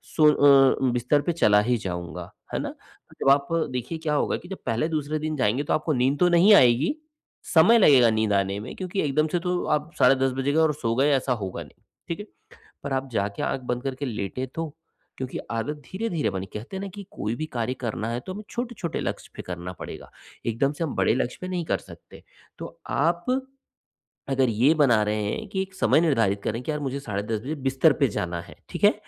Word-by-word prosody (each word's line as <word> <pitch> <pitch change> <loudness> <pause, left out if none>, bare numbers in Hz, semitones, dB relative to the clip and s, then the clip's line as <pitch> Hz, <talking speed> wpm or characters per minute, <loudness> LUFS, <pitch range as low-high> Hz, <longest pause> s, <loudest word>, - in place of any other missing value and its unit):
सो 155 -2 +6
अ, 135 -2 +5
बिस्तर 125 +4 +2
पे 160 - -1
चला 105 -10 +4
ही 120 +3 +1
जाऊँगा, 90 -5 -6 0.2
है - - 0
ना? - - -4 0.5
जब - - +3
आप 140 0 +3 0.2
देखिए 125 +6 -4
क्या 155 -1 -1
होगा - - +1
कि 175 - -13
जब 195 - -5
पहले 115 +7 +1
दूसरे 155 -1 -2
दिन 155 0 -2
जाएँगे 130 +2 +1
तो - - -1
आपको 155 0 -1
नींद 130 +2 +1
तो 180 - +5
नहीं 175 +5 +6
आएगी, 130 - +4 0.6
समय 175 +9 +7
लगेगा 135 - +6
नींद 110 -1 +1
आने 100 0 0
में 120 - -8
क्योंकि 185 +1 -3
एकदम 155 +1 +1
से 175 - +1
तो 180 0 -1
आप 150 +2 -10
साढ़े 135 - +6
10 135 0 +1
बजे 135 +1 0
गए 160 - +3
और 160 -1 +3
सो 115 -6 -2
गए, 135 +4 +3
ऐसा 135 -2 +2
होगा 100 -6 -5
नहीं, - - -20 0.3
ठीक 170 - -3
है? 205 - -6 0.6
पर 140 - -3
आप 135 0 -1
जाके 100 -2 -2
आँख - - -1
बंद 125 0 -2
करके 135 +1 -3
लेटें 115 +2 -3
तो, 165 -3 -4 0.4
क्योंकि 130 0 -4
आदत 115 +7 -2
धीरे-धीरे 190 -5 -1
बनी 95 0 -4
कहते 115 - -6
हैं 190 - -4
ना 200 - -4
कि 200 -2 -9
कोई 105 +3 -3
भी 155 - -3
कार्य 120 +1 -1
करना 115 -2 -3
है, 120 +1 -2
तो 185 - -7
हमें 210 - -7
छोटे-छोटे 235 -8 -4
लक्ष्य - - -4
पे - - -6
करना 90 0 -6
पड़ेगा, - - -8 0.4
एकदम 120 +5 +1
से 160 +3 -3
हम 155 - -3
बड़े - - +3
लक्ष्य 125 0 -2
पे 185 - -5
नहीं 180 -2 -2
कर - - 0
सकते। - - -15 0.4
तो - - -9 0.2
आप 170 +4 +1 1.0
अगर 135 -2 +2
ये 120 +7 +4
बना 120 -7 +5
रहे 105 0 -1
हैं 215 - -3
कि 190 -1 -1
एक 190 0 -6
समय 155 -5 +3
निर्धारित 115 - +2
करें, 115 +2 -2
कि 155 - -2
यार 150 - -2
मुझे 140 -1 -3
साढ़े 105 -6 -3
10 110 0 -2
बजे 145 +4 -3
बिस्तर 135 +3 +4
पे 140 - +4
जाना 90 -5 -3
है, 85 - -14
ठीक - - -7
है, - - +7
135 Hz, 225 wpm, -25 LUFS, 115-160 Hz, 1.0 s, समय